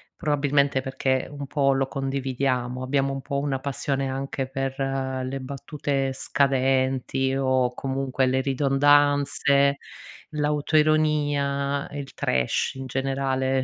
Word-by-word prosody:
probabilmente 140 -3 +1
perché 130 0 -1
un 140 -1 -7
po' 140 -1 +2
lo 135 0 0
condividiamo, 130 -2 -2
abbiamo 135 +1 0
un 135 - -4
po' 140 0 -2
una 140 -2 -1
passione 135 0 -2
anche 135 0 -3
per 135 0 -3
le 135 -1 -2
battute 140 0 -2
scadenti 135 -1 +1
o 130 -2 +1
comunque 135 0 -1
le 130 +1 +1
ridondanze, 140 +1 +3 0.6
l'autoironia, 150 -2 +1
il 140 -2 -6
trash 65 - 0
in 135 0 -6
generale, 135 0 0
135 Hz, 110 wpm, -25 LUFS, 130-140 Hz, 0.6 s, ridondanze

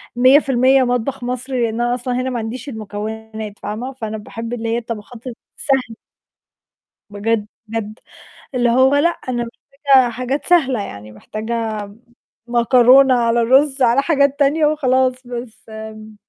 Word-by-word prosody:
100% 265 0 +4
مطبَخ 245 +1 -2
مصري، 250 +1 -2
لإن 230 0 -1
أنا 240 0 +1
أصلًا 250 0 -3
هنا 260 - -2
ما 245 -2 -3
عنديش 235 +6 -6
المكونات 220 -1 -7
فاهمة، 230 +6 -5
فأنا 220 -4 -5
باحب 230 +2 -7
اللي 230 -1 -3
هي 230 - 0
الطبخات 230 0 -7 0.3
السهل 265 -5 -1 1.1
بجد، 210 +1 -1 0.2
بجد، 220 0 -5 0.6
اللي 245 -1 +2
هو 260 +3 +4
لأ، 295 +4 +4
أنا 250 -7 -4
محتاجة 270 +1 +1
حاجات 255 +4 -3
سهلة، 270 -10 +3
يعني 105 - -9
محتاجة 215 - -4
م 200 +3 -16 0.5
مكرونة 250 +2 +5
على 235 0 +2
رُز 270 +3 +3
على 245 +2 +4
حاجات 280 -2 +1
تانية 295 +2 +3
وخلاص 260 -4 +2
بس 240 -2 -8
م 220 0 -9
240 Hz, 140 wpm, -18 LUFS, 220-265 Hz, 1.1 s, مكرونة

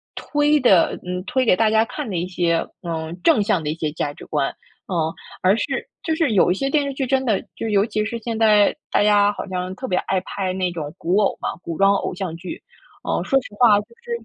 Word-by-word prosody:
推 295 0 +2
的 200 -10 +4
嗯， 180 0 -3
推 260 +4 0
给 205 - +5
大 220 +2 +3
家 220 0 +4
看 285 0 -6
的 190 - -3
一 170 - -1
些， 175 -2 0 0.2
嗯， 165 0 -4
正 260 -11 +4
向 185 -3 +1
的 150 - -2
一 - - 0
些 155 -2 -2
价 145 -2 -3
值 - - -12
观。 145 -3 -1 0.4
嗯， 185 - -2 0.5
而 185 +2 +4
是 - - 0 0.4
就 320 - 0
是 315 -6 +1
有 190 - +4
一 - - +1
些 275 +7 -1
电 290 0 +2
视 280 - -3
剧 270 0 -2
真 265 0 +1
的 215 -6 +1 0.2
就 225 - -3
尤 205 -1 +3
其 215 -2 -2
是 235 +3 -3
现 225 0 -4
在 210 -2 +5 0.2
大 - - +3
家 205 -1 +4
好 - - -6
像 185 0 -4
特 260 - -6
别 180 - 0
爱 190 -1 +1
拍 185 0 -3
那 185 -1 -1
种 155 -3 -6
古 180 +2 0
偶 200 - +1
嘛- - - -1
古 165 -2 -5
装 195 0 +5
偶 195 - -2
像 180 -3 -4
剧。 175 +1 -8 0.4
哦， - - -1
说 270 - +2
实 - - -10
话 215 -4 +6
就 - - -16 0.2
是 475 - -9
200 Hz, 265 characters per minute, -21 LUFS, 180-235 Hz, 0.5 s, 话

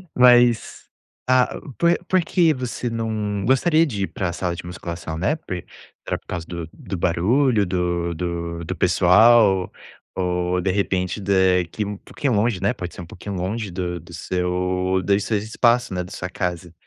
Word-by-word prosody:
Mas 120 -2 +4 0.4
ah, 130 -1 +2 0.2
por 170 0 +3
por 185 -1 +3
que 165 -3 +3
você 125 -1 -4
não 110 -3 -2
gostaria 155 +6 +4
de 105 -10 -3
ir - - -1
para 95 - -3
a 85 - -4
sala 85 -1 -2
de 85 - -8
musculação, 85 -2 -6
né? 95 - +1
Por 95 - -6 0.5
era - - -1
por - - -23
causa 85 -2 -4
do 85 -2 -6
do 95 - -6
barulho, 105 +7 +2
do 85 -1 -1
do 85 0 -4
do - - -4
pessoal, 100 0 +5 0.4
ou 90 0 0
de 95 0 0
repente 95 -1 -1
de 95 -2 +3
que 105 +5 -4
um 100 0 -5
pouquinho 130 +5 -3
longe, 105 -2 +1
né, 100 +5 +2
pode 90 -6 -7
ser - - -8
um 85 - -8
pouquinho 95 +4 -7
longe 100 +4 -3
do 90 -1 -3
do 85 +2 -14
seu 90 +2 -1
dos 100 +3 +2
seus 105 -2 -1
espaços, 120 +2 +2
né, 90 -1 -2
da 90 - -12
sua 90 -2 -5
casa. 90 -2 -4
95 Hz, 180 wpm, -22 LUFS, 90-115 Hz, 0.5 s, pessoal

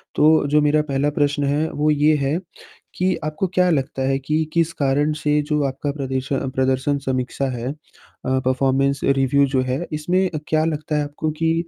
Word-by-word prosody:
तो 155 -1 +4
जो 150 +1 +3
मेरा 150 +1 +3
पहला 140 +2 +1
प्रश्न 145 0 0
है 145 +3 0
वो 150 +1 0
ये 150 +1 +3
है, 140 +3 0 0.6
कि, 185 +1 +1
आपको 155 +5 -1
क्या 180 0 +4
लगता 135 -3 -1
है 135 0 +1
कि 155 +4 0
किस 165 -1 +2
कारण 145 +2 +1
से 150 0 +2
जो 150 -1 +1
आपका 140 +2 -3
प्रदर्श 135 -1 -3
अ, 135 - -1
प्रदर्शन 130 +2 +1
समीक्षा 130 +1 -1
है 125 +3 -3
अ, 130 -3 -5
परफॉर्मेंस 135 +1 +1
रिव्यू 140 +1 +3
जो 130 -1 0
है, 130 +6 -2
इसमें 180 +5 +1 0.2
क्या 155 0 +2
लगता 155 -1 -2
है 150 - +1
आपको 150 +2 -3
कि 165 0 +3
145 Hz, 185 wpm, -21 LUFS, 135-155 Hz, 0.6 s, तो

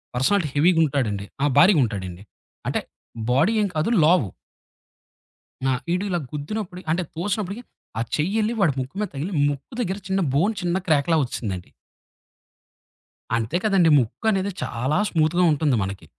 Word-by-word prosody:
Personality 155 +7 +2
హెవీగా 165 +3 +4
ఉంటాడండి. 115 -9 -1 0.2
ఆ! - - +4
భారీగా 175 +2 +7
ఉంటాడండి. 95 -5 -4 0.4
అంటే - - 0 0.5
బాడీ 135 - +3
ఏం 205 - +2
కాదు 155 +6 +1
లావు. 160 - +4 1.4
ఆ! - - +3 0.2
ఈడు 180 +2 0
ఇలా 175 -2 0
గుద్దినప్పుడు 180 +5 -5
అంటే 175 +3 +1
తోసినప్పటికి, 200 +5 -3 0.4
ఆ - - +1
చెయ్యి 170 +8 -1
ఎళ్లి 215 +2 0
వాడి 165 -7 +4
ముక్కు 130 +5 -5
మీద 210 - -2
తగిలి 160 +8 -3 0.2
ముక్కు 140 - -6
దగ్గర 190 -4 -2
చిన్న 195 0 0 0.2
బోన్ 190 +10 +2
చిన్న 175 0 0
క్రాక్‌లా 155 +1 +3
ఒచ్చేసిందండి. 100 -8 -5 1.7
అంతే 115 +9 -1
కదండీ. 195 -6 +4
ముక్కనేది 195 - 0
చాలా 130 +7 -1
స్మూత్‌గా 165 +2 +2
ఉంటుంది 150 -3 +2
మనకి. 95 0 -6
160 Hz, 140 wpm, -23 LUFS, 130-190 Hz, 1.7 s, భారీగా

